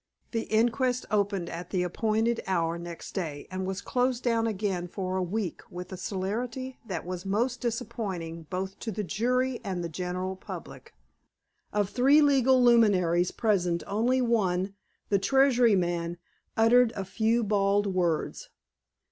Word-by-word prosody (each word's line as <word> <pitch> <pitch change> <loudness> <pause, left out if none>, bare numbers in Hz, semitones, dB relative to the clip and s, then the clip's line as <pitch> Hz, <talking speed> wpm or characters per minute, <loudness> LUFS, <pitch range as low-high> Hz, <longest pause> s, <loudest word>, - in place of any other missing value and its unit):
The 225 -2 -1
inquest 240 +3 +2
opened 200 -4 +1
at 170 +1 -6
the 185 -2 0
appointed 220 +5 0
hour 170 -2 0
next 170 -1 -8
day, 155 -7 -4
and 185 0 -3
was 190 +1 -3
closed 250 +1 0
down 230 -2 +2
again 195 -4 -2
for 185 +1 -3
a 190 - 0
week 185 0 -3
with 180 +1 -8
a - - -3
celerity 230 +8 -4
that 175 -4 -4
was 180 0 -5
most 235 +6 0
disappointing 195 -9 -4
both 190 +1 -4
to 225 - -4
the 210 +1 -3
jury 250 +5 0
and 185 -3 -3
the 170 - -3
general 180 +3 -3
public. 185 - -10 0.8
Of 205 -2 0
three 270 +4 +5
legal 265 -3 +4
luminaries 185 -8 +4
present 180 -6 0
only 240 +6 +1
one, 195 -5 +1 0.4
the 200 - +3
Treasury 245 0 +4
man, 175 -1 -1 0.4
uttered 230 +1 +5
a 195 - -3
few 225 +4 +1
bald 205 -1 +2
words. 180 -5 -1
200 Hz, 150 wpm, -28 LUFS, 180-235 Hz, 0.8 s, three